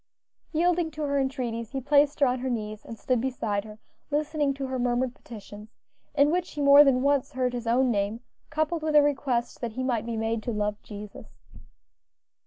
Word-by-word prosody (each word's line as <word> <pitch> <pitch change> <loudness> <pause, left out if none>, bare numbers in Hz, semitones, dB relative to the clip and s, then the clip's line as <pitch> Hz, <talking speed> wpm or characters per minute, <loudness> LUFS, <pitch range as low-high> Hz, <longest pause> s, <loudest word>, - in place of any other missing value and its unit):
Yielding 345 +1 +1
to 310 0 -6
her 280 -1 0
entreaties, 245 -4 -2
he 270 - -1
placed 285 +2 +3
her - - +7
on 250 0 +1
her 260 +1 -2
knees, 215 -3 -4
and 230 - -8
stood 250 +1 0
beside 225 -6 -2
her, 215 -1 -11 0.3
listening 295 -1 0
to 275 0 -4
her 260 -1 -3
murmured 245 0 0
petitions, 210 -2 -11 0.5
in 285 0 +4
which 355 +1 0
he 300 - -7
more 280 +1 +9
than 260 -3 +3
once 280 -2 +1
heard 250 -1 0
his 240 -1 -5
own 250 +2 +3
name 205 +1 -1 0.3
coupled 315 +1 -1
with 310 -1 -1
a 295 - +8
request 265 -4 -1
that 235 -3 -3
he 255 +3 -3
might 235 -3 -1
be 230 -1 -3
made 225 0 -1
to 240 - -3
love 210 -1 -2
Jesus. 205 -1 -10
255 Hz, 195 wpm, -27 LUFS, 230-285 Hz, 0.5 s, more